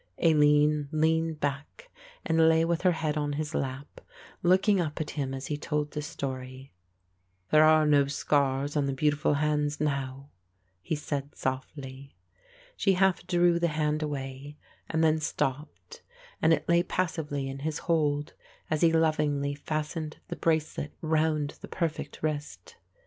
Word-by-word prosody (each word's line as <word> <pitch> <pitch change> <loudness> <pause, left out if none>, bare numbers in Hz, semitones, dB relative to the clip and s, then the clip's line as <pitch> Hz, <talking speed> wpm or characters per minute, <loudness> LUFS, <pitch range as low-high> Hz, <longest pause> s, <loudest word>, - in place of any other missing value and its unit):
Aline 150 -2 +3
leaned 160 0 +1
back 145 - -4 0.3
and 160 -1 +4
lay 160 0 +4
with 170 0 0
her 180 -1 +3
head 155 -2 -2
on 145 -1 -1
his 150 +1 -3
lap, 135 +1 -4 0.4
looking 190 +2 +4
up 155 -3 -3
at 155 - -3
him 140 -3 -3
as 135 0 -5
he 150 - -3
told 150 0 -2
the 150 - -4
story. 130 -2 -6 0.8
"There 155 0 +7
are 155 0 +5
no 145 -2 +4
scars 140 0 0
on 145 -2 +1
the 135 - -1
beautiful 150 +2 +1
hands 150 0 0
now," 140 -2 -3 0.5
he 155 - -2
said 145 -1 -4
softly. 130 +1 -5 0.6
She 195 - +2
half 190 -1 +2
drew 175 -1 +3
the 170 - +2
hand 150 0 0
away 140 -1 -5 0.3
and 160 0 +1
then 160 0 +3
stopped 135 - -4 0.4
and 160 - +4
it 155 -1 +1
lay 170 0 +4
passively 160 -6 -2
in 135 0 -6
his 150 +1 -2
hold 150 -3 +1 0.4
as 155 - +1
he 165 -1 +5
lovingly 150 -3 +1
fastened 155 +2 -4
the - - -3
bracelet 155 -2 -1
round 155 -2 0
the - - -8
perfect 165 -3 -4
wrist. 150 -1 -4
150 Hz, 150 wpm, -28 LUFS, 140-160 Hz, 0.8 s, There